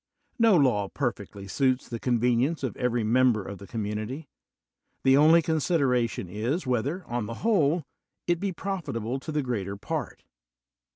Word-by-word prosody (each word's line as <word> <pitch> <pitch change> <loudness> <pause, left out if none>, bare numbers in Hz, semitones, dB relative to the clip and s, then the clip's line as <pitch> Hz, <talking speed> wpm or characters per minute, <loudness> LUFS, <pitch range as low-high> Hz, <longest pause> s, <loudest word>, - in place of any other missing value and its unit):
No 225 -5 +6
law 110 -9 +2
perfectly 100 -6 -4
suits 130 +4 +1
the 115 - -5
convenience 125 +6 +1
of 125 -6 -2
every 120 -2 0
mem 125 +3 +4
ber 105 -2 -3
of 100 0 -8
the 100 - -11
community; 110 - -4 0.8
the 135 0 +5
only 160 +4 +6
consideration 140 - +1
is, 115 - -2
whether, 135 +8 -1
on 120 -3 -3
the 115 - -5
whole, 170 -7 +3 0.4
it 175 -1 +1
be 195 +1 -1
profitable 145 - -3
to 155 - -7
the 150 -1 0
greater 100 -6 -3
part. - - -5
125 Hz, 155 wpm, -27 LUFS, 110-155 Hz, 0.8 s, No